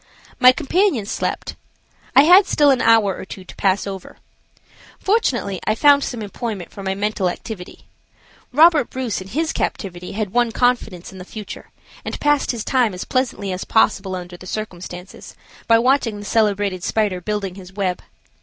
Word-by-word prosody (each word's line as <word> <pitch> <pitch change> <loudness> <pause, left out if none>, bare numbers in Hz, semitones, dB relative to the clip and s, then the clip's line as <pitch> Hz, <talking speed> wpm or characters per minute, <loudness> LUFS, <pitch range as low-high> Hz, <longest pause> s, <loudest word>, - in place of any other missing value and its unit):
My 255 0 +8
companion 310 - +1
slept. - - -3 0.6
I 275 - +9
had 365 +5 +7
still 290 -2 +4
an 260 - +2
hour 225 -4 +4
or - - -8
two 190 0 -9
to - - -13
pass 195 0 +1
over. 195 -2 -8 0.8
Fortunately 250 - 0
I 215 - +2
found 285 +3 +5
some 235 -3 -4
employment 205 -3 -5
for 200 - -9
my 190 0 -2
mental 200 -2 -1
activity. 180 0 -8 0.7
Robert 310 -1 +5
Bruce 250 -7 -3
in 185 - -9
his 315 +10 -2
captivity 180 -3 -4
had 210 -2 -3
won 240 -1 +2
confidence 235 -8 0
in 190 - -11
the - - -7
future, 210 +2 -9 0.3
and - - -5
passed 295 -1 +2
his 235 -4 -2
time 245 -7 +1
as 180 - -6
pleasantly 250 -7 -1
as 185 +1 -4
possible 210 -4 +1
under 180 -1 -8
the 185 - -12
circumstances, 185 -3 -7 0.3
by 230 - +6
watching 240 -2 +2
the 205 - -8
celebrated 205 -4 0
spider 205 -5 0
building 205 -1 -3
his 185 -1 -12
web. 190 -2 -2
210 Hz, 170 wpm, -20 LUFS, 190-250 Hz, 0.8 s, I